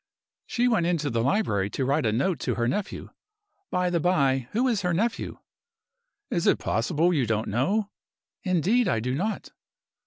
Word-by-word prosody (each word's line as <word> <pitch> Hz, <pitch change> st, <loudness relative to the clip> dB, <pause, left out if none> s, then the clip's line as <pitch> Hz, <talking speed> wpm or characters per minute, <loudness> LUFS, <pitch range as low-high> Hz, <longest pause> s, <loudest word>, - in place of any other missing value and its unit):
"She 245 Hz, +1 st, +1 dB
went 175 Hz, -9 st, +2 dB
into 155 Hz, -5 st, 0 dB
the 115 Hz, 0 st, 0 dB
library 115 Hz, -, +1 dB
to 130 Hz, -, -2 dB
write 140 Hz, -1 st, +1 dB
a -, -, +2 dB
note 140 Hz, -, 0 dB
to -, -, -1 dB
her 120 Hz, 0 st, 0 dB
nephew. 195 Hz, +11 st, -3 dB, 0.6 s
By 180 Hz, -1 st, 0 dB
the 170 Hz, -, +1 dB
by, 135 Hz, -7 st, +2 dB
who 245 Hz, +5 st, +1 dB
is 225 Hz, -5 st, +1 dB
her 180 Hz, -2 st, 0 dB
nephew?" 225 Hz, +6 st, -1 dB, 0.9 s
"Is 170 Hz, -, 0 dB
it -, -, +4 dB
possible 155 Hz, +10 st, +1 dB
you 135 Hz, -7 st, +1 dB
don't 110 Hz, 0 st, 0 dB
know?" 195 Hz, -, 0 dB, 0.5 s
"Indeed, 195 Hz, +6 st, +2 dB
I 115 Hz, -, +1 dB
don't." 135 Hz, -, -2 dB
165 Hz, 165 wpm, -26 LUFS, 125-195 Hz, 0.9 s, it